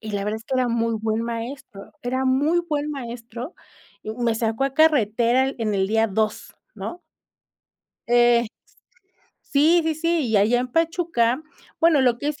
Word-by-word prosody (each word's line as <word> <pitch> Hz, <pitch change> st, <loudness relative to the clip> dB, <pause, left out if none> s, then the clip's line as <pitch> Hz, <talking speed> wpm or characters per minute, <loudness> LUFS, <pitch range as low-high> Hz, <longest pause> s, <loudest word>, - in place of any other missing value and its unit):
Y 220 Hz, -, -7 dB
la 200 Hz, -1 st, -2 dB
verdad 210 Hz, +1 st, -2 dB
es 225 Hz, -, -16 dB
que 265 Hz, -, -3 dB
era 255 Hz, -1 st, +1 dB
muy 230 Hz, 0 st, 0 dB
buen 220 Hz, 0 st, -1 dB
maestro, 230 Hz, -3 st, -7 dB
era 260 Hz, +2 st, -1 dB
muy 285 Hz, +6 st, +2 dB
buen 295 Hz, 0 st, -1 dB
maestro, 240 Hz, 0 st, -7 dB, 0.5 s
y 215 Hz, -, -6 dB
me 235 Hz, -1 st, -1 dB
sacó 225 Hz, +3 st, -1 dB
a 275 Hz, -1 st, -2 dB
carretera 250 Hz, -5 st, +3 dB
el 270 Hz, -, -4 dB
en 215 Hz, -2 st, -1 dB
el 190 Hz, -1 st, +1 dB
día 225 Hz, +2 st, +2 dB
2, 215 Hz, +1 st, -2 dB, 0.2 s
¿no? 350 Hz, 0 st, -7 dB, 1.1 s
Eh 240 Hz, 0 st, +4 dB, 1.1 s
sí, 320 Hz, +5 st, +4 dB
sí, 320 Hz, 0 st, 0 dB
sí, 330 Hz, -3 st, 0 dB
y 220 Hz, -2 st, +3 dB
allá 225 Hz, +5 st, +3 dB
en 250 Hz, -, -3 dB
Pachuca 320 Hz, -5 st, 0 dB, 0.4 s
bueno, 325 Hz, -3 st, +4 dB
lo 250 Hz, -3 st, +3 dB
que 285 Hz, -, -3 dB
es 300 Hz, -1 st, -4 dB
245 Hz, 175 wpm, -23 LUFS, 225-290 Hz, 1.1 s, Eh